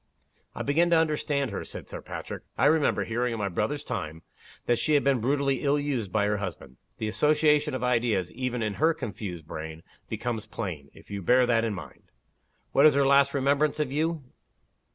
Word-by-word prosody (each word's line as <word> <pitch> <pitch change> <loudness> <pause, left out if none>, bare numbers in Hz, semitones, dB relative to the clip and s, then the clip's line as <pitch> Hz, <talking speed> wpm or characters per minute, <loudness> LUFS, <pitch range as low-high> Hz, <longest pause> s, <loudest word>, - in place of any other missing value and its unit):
"I - - -3
begin 165 +5 +2
to 170 - +5
understand 150 -4 0
her," 100 - -4
said - - -8
Sir - - -7
Patrick. - - -7 0.2
"I 125 - +3
remember 150 0 +3
hearing, 120 +1 -1
in - - -3
my 100 -2 -1
brother's 110 +11 -2
time, 80 +1 -5 0.4
that 120 -1 +2
she 155 - +2
had 145 - +3
been 140 -2 +3
brutally 135 +2 +1
ill 145 0 +2
used 135 -9 -2
by 105 -1 +2
her 105 0 +1
husband. 85 -10 -7 0.2
The 110 - -3
association 150 +3 +3
of 130 - -3
id 125 -2 +2
eas, 95 -7 0
even 125 -1 -2
in 105 -1 -1
her 160 +1 +4
confused 95 -6 -6
brain, 80 +1 -7 0.3
becomes 115 -3 -3
plain, 85 -12 -5
if - - -16
you 100 -1 -4
bear 125 +7 +4
that 115 -2 +2
in 110 -3 -1
mind. 90 - -11 0.6
What 140 +3 +6
is 150 - +4
her 140 -1 +3
last 140 +1 +4
remembrance 140 +3 +2
of 145 -4 -1
you? 160 +1 -1
125 Hz, 200 wpm, -27 LUFS, 105-145 Hz, 0.6 s, What